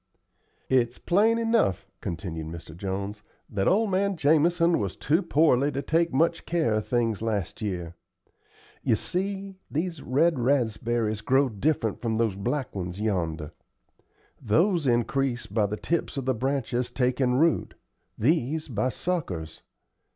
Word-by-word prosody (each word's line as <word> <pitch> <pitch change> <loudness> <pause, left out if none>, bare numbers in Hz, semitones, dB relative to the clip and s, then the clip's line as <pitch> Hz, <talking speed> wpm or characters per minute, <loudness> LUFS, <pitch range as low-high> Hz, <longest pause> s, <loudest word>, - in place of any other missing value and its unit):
"It's 125 -2 +2
plain 215 +6 +3
enough," 225 - +1 0.2
continued 80 -2 -4
Mr. 80 -1 -9
Jones, 100 +3 -4 0.3
"that 95 -2 -1
old 210 +2 +3
man 195 0 +1
Jamison 165 +3 +3
was 100 -3 -2
too 160 +6 +1
poorly 145 -5 +3
to 140 +2 -2
take 165 +1 +1
much 165 +4 +1
care 160 -10 +1
of 110 0 -1
things 115 -3 0
last 105 -5 -2
year. 90 -5 -3 0.9
You - - +2
see, 195 - -3
these 165 0 -2
red 150 +3 +2
raspberries 115 -3 0
grow 130 +4 +3
different 115 0 -1
from 115 -2 -1
those 110 -4 +1
black 130 +8 -2
ones 90 0 -4
yonder. 85 -8 -1 0.9
Those 160 - +2
increase 120 0 +1
by 105 0 0
the 105 +1 -4
tips 170 +1 -2
of 135 - -3
the 130 - +2
branches 125 0 -1
takin' 125 0 +1
root; 160 +4 +2 0.4
these 155 +4 +1
by 115 +1 0
suckers. 100 - -3
125 Hz, 135 wpm, -26 LUFS, 105-160 Hz, 0.9 s, plain